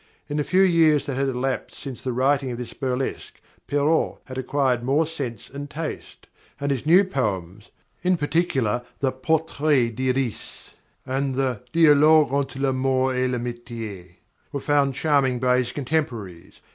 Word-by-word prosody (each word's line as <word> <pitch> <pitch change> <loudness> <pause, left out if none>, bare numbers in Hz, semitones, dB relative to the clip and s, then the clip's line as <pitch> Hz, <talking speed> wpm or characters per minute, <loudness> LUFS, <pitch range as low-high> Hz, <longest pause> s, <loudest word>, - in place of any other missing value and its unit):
In 145 0 -3
the 150 - +1
few 185 +5 +3
years 165 -5 +4
that 135 - -3
had 135 +1 0
elapsed 130 +1 -3
since 135 -4 -7
the 130 - -2
writing 135 +2 +1
of 120 - -4
this 120 -1 -7
burlesque 130 -1 -3 0.3
Perrault 145 +3 +1
had 130 - -8
acquired 130 -2 +1
more 140 +6 +2
sense 140 -8 -6
and 140 +1 -8
taste, 155 +2 -6 0.3
and 140 0 -1
his 135 +1 -2
new 180 +5 +7
poems 105 - -3 0.3
in 180 0 +2
particular 145 -8 0 0.2
the 135 -2 +1
"Portrait 145 -2 +1
d'Iris" 130 -2 -2 0.3
and 135 0 -1
the 130 -4 -1
"Dialogue 155 -3 +5
entre 140 -1 -1
l'Amour 130 -1 +1
et 130 0 +1
l'Amitié" 115 -7 -6 0.4
were 140 - -3
found 140 -1 +1
charming 140 -4 +2
by 125 0 +3
his 120 -1 -2
contemporaries. 120 - -3
135 Hz, 150 wpm, -24 LUFS, 125-145 Hz, 0.4 s, new